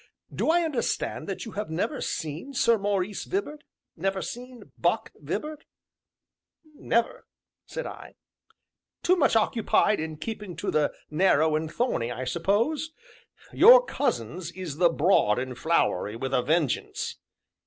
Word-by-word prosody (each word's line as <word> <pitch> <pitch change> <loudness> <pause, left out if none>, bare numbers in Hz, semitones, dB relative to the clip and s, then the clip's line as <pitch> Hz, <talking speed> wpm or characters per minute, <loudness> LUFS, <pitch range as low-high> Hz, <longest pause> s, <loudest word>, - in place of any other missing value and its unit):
"Do - - 0
I 345 +1 +4
understand 305 -7 -2
that - - -4
you 225 - -7
have 210 -2 -4
never 210 - -2
seen 160 - -4
Sir 235 -2 +3
Maurice 200 0 -1
Vibart, 305 -6 -3 0.3
never 195 +3 -1
seen 245 +4 -8
'Buck' - - 0
Vibart?" 305 0 -5 1.1
"Never!" 235 -5 -1 0.4
said - - -5
I. - - -9 0.9
"Too 365 - +4
much 285 -9 +3
occupied 220 -1 +2
in 160 0 -4
keeping 210 -1 -6
to 170 - -3
the 150 -1 +2 0.2
Narrow 155 -2 +3
and 155 0 -2
Thorny, 230 - -1
I 125 - -4
suppose? 210 - 0 0.6
Your - - +8
cousin's 175 - -2
is 180 -6 -6
the 175 0 +5
Broad 155 - +3
and 125 0 -3
Flowery, 115 - 0
with 130 +3 -4
a 125 - +3
vengeance." 155 0 -1
195 Hz, 135 wpm, -27 LUFS, 155-250 Hz, 1.1 s, Your